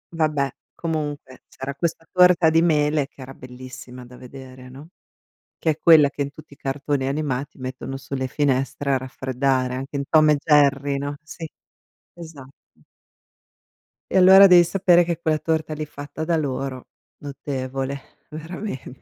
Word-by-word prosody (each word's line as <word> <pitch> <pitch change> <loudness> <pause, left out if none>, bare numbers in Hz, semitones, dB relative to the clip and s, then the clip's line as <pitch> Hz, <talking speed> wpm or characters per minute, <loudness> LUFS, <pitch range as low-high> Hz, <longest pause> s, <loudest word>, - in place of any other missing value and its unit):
Vabbè, 150 -4 +1 0.3
comunque 150 -5 -5
c'era 135 +1 -7
questa 165 +2 -3
torta 180 -2 +5
di 165 +1 +4
mele 150 -3 +1
che 140 - -30
era 130 +1 -9
bellissima 125 0 -11
da 125 +1 -14
vedere, 130 0 -12
no, 140 +5 -13 0.7
che 160 - 0
è 155 - -3
quella 160 -4 +6
che 145 - -4
in 140 - -4
tutti 145 0 -15
i - - -28
cartoni 135 0 -2
animati 140 -1 -3
mettono 130 +1 -6
sulle 135 -1 -4
finestre 135 0 -1
a - - +3
raffreddare, 130 0 -2
anche 135 +2 -5
in 140 - -2
Tom 155 -1 +5
e 150 - +4
Jerry, 140 -2 +3
no? 145 +1 -4
Sì, 160 +1 -8 0.7
esatto. 160 -6 -11 1.6
E - - +2
allora 190 +2 +8
devi 180 -2 +7
sapere 175 0 +3
che 170 -1 -3
quella 160 -2 0
torta 160 -1 -2
lì 155 0 -5
fatta 145 +1 -8
da 170 0 +1
loro, 135 -3 -4 0.3
notevole 135 -1 -5 0.3
veramente. 160 -3 -8
145 Hz, 150 wpm, -22 LUFS, 130-160 Hz, 1.6 s, allora